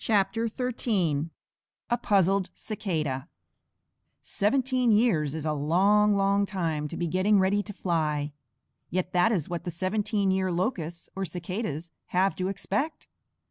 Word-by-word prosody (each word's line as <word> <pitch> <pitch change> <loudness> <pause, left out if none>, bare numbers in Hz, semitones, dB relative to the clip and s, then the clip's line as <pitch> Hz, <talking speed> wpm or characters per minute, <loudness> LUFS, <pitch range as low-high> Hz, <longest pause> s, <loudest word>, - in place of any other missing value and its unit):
A 220 - -1
PUZZLED 195 -1 +2
CICADA 155 - -3 1.0
Seventeen 255 +3 +1
years 195 - +3
is 160 -1 -4
a 155 - +1
long, 195 +8 +3
long 200 0 +2
time 165 -6 -2
to - - -7
be 175 - -1
getting 185 +5 +3
ready 195 +2 +3
to 205 - -8
fly; 155 -6 -1 0.6
yet 185 0 -2
that 180 +5 +4
is 180 -9 0
what 170 -1 -4
the 175 - -3
Seventeen 195 +3 0
year 190 -1 +1
Locusts, 175 -3 -2
or 195 - -2
Cicadas, 175 -2 -4 0.2
have 190 +2 +2
to 185 - -1
expect. 200 - -2
190 Hz, 130 wpm, -27 LUFS, 165-210 Hz, 1.0 s, that